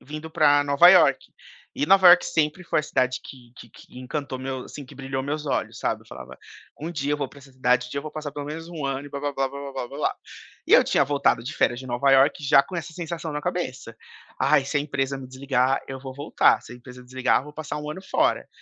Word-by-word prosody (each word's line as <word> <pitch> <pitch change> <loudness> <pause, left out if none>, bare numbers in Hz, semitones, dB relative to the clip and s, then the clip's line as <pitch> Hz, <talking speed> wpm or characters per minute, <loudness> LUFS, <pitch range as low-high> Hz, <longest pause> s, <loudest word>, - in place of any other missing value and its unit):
vindo 155 +3 -8
para 145 -2 +4
Nova 140 +5 +6
Iorque. - - +4 0.4
E 280 - 0
Nova 190 -2 +7
Iorque 175 +1 +7
sempre 155 +4 -1
foi 160 - +1
a - - -10
cidade 130 -3 0
que 125 -3 -13
que 120 - -13
que 125 - -15
encantou 130 +1 -5
meu 130 0 -4
assim, 145 - -9
que 130 - -15
brilhou 135 -1 -4
meus 150 +2 -3
olhos, 140 - -2
sabe, - - -2
eu - - -25
falava: - - -11 0.4
"Um 160 +3 -4
dia 145 -3 -2
eu - - +1
vou 140 -3 -3
para 145 - -16
essa 135 0 -17
cidade, 125 -1 +1
um - - -15
dia 140 - -3
eu - - -4
vou 155 - -7
passar 155 -2 -6
pelo 145 0 -6
menos 160 +2 -7
1 165 -4 -6
ano", 135 +1 -3
e - - -12
blá, 140 - -5
blá, 145 0 -2
blá, 135 -1 -1
blá, 140 +1 -8
blá, 130 -2 -5
blá. 140 +3 -2 0.5
E - - 0
eu - - +8
tinha - - +2
voltado 140 -4 +1
de 125 - -6
férias 120 +1 +1
de 130 - -10
Nova 125 +3 +1
Iorque, 135 +2 +4
já 140 0 +6
com 185 - -8
essa 165 -1 -6
sensação 165 -1 -5
na 150 - -3
cabeça: 150 -9 -4 0.4
"Ai 135 - +3
se 140 - -2
a - - +2
empresa 135 -2 -2
me 130 - -9
desligar, 130 0 0
eu 135 - -6
vou 130 -1 -8
voltar; 145 +3 +2
se - - -12
a - - -10
empresa 125 0 -13
desligar, 130 0 +1
eu - - -12
vou 150 - -11
passar 150 -1 -6
1 150 0 -6
ano 155 - -7
fora". - - 0
140 Hz, 260 wpm, -24 LUFS, 130-150 Hz, 0.5 s, eu